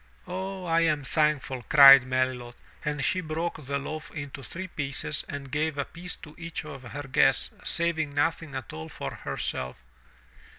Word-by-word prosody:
*'0h, 190 Hz, -1 st, -5 dB
I 165 Hz, 0 st, +3 dB
am 155 Hz, -3 st, +2 dB
thankful," 150 Hz, -3 st, +1 dB
cried 135 Hz, -2 st, +11 dB
Melilot, 130 Hz, -2 st, -1 dB, 0.3 s
and 145 Hz, -2 st, -1 dB
she 185 Hz, -, +1 dB
broke 160 Hz, 0 st, -3 dB
the 140 Hz, +1 st, -2 dB
loaf 155 Hz, +3 st, -6 dB
into 140 Hz, -2 st, -7 dB
three 185 Hz, +7 st, -6 dB
pieces 140 Hz, -2 st, -2 dB
and 140 Hz, -2 st, -6 dB
gave 155 Hz, 0 st, 0 dB
a 140 Hz, -, 0 dB
piece 175 Hz, +2 st, -6 dB
to 150 Hz, -, -12 dB
each 170 Hz, -2 st, -5 dB
of 140 Hz, -3 st, -8 dB
her 140 Hz, +3 st, -7 dB
guests, 130 Hz, -2 st, +3 dB
saving 160 Hz, -4 st, 0 dB
nothing 160 Hz, 0 st, 0 dB
at 130 Hz, -2 st, -6 dB
all 80 Hz, +1 st, -7 dB
for -, -, -5 dB
herself. 65 Hz, 0 st, -4 dB
150 Hz, 165 wpm, -27 LUFS, 135-165 Hz, 0.3 s, cried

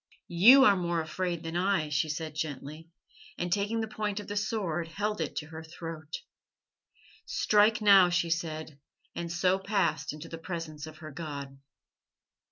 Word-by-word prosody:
'You 235 Hz, +11 st, +8 dB
are 205 Hz, -, +6 dB
more 175 Hz, -2 st, -1 dB
afraid 170 Hz, +1 st, -3 dB
than 165 Hz, +1 st, -5 dB
I,' 180 Hz, -4 st, +1 dB
she 150 Hz, +1 st, 0 dB
said 155 Hz, 0 st, -4 dB
gently, 155 Hz, +1 st, -6 dB, 0.5 s
and 175 Hz, 0 st, -1 dB
taking 210 Hz, +3 st, 0 dB
the 220 Hz, -, -2 dB
point 210 Hz, -1 st, -3 dB
of 205 Hz, -, -7 dB
the 205 Hz, -, -4 dB
sword 195 Hz, -6 st, -1 dB
held 205 Hz, +5 st, -2 dB
it -, -, -3 dB
to 150 Hz, -, -3 dB
her 160 Hz, 0 st, -8 dB
throat. 160 Hz, -1 st, -7 dB, 1.1 s
"'Strike 215 Hz, +1 st, +3 dB
now,' 195 Hz, -3 st, +7 dB
she 170 Hz, -1 st, 0 dB
said, 160 Hz, -3 st, -3 dB, 0.3 s
and 170 Hz, -1 st, -5 dB
so 180 Hz, +2 st, +2 dB
passed 190 Hz, -7 st, 0 dB
into 150 Hz, +2 st, -9 dB
the 165 Hz, 0 st, -8 dB
presence 165 Hz, -3 st, -6 dB
of 155 Hz, -1 st, -11 dB
her 155 Hz, -, -7 dB
God." 140 Hz, -3 st, -7 dB
170 Hz, 165 wpm, -29 LUFS, 155-200 Hz, 1.1 s, You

